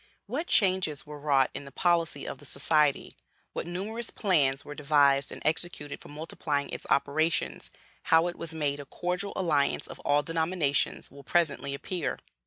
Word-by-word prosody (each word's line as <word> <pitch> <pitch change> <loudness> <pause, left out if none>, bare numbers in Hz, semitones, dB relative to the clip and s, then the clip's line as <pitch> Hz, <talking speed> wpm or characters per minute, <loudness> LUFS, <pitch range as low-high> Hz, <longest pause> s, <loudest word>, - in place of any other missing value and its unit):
What 280 +11 -3
changes 185 -7 +2
were 150 -1 -9
wrought 140 -2 +3
in 140 - -6
the 140 - -10
policy 165 -2 +1
of - - -6
the 145 - -14
Society, 150 +1 +3 0.4
what - - -4
numerous 215 +7 -3
plans 145 -9 +2
were 145 - -7
devised 140 -2 +3
and - - -8
executed 155 -2 0
for - - -12
multiplying 150 -1 -3
its - - -6
operations, 155 +4 +1 0.4
how 160 +1 +5
it 175 0 -2
was 165 - -6
made 145 -3 -1
a 145 - -7
cordial 180 +7 -3
alliance 150 -6 +1
of - - -9
all 145 +1 +2
denominations, 160 -3 0
will 140 +1 -13
presently 145 -5 0
appear. 180 +5 -3
155 Hz, 165 wpm, -29 LUFS, 140-175 Hz, 0.4 s, how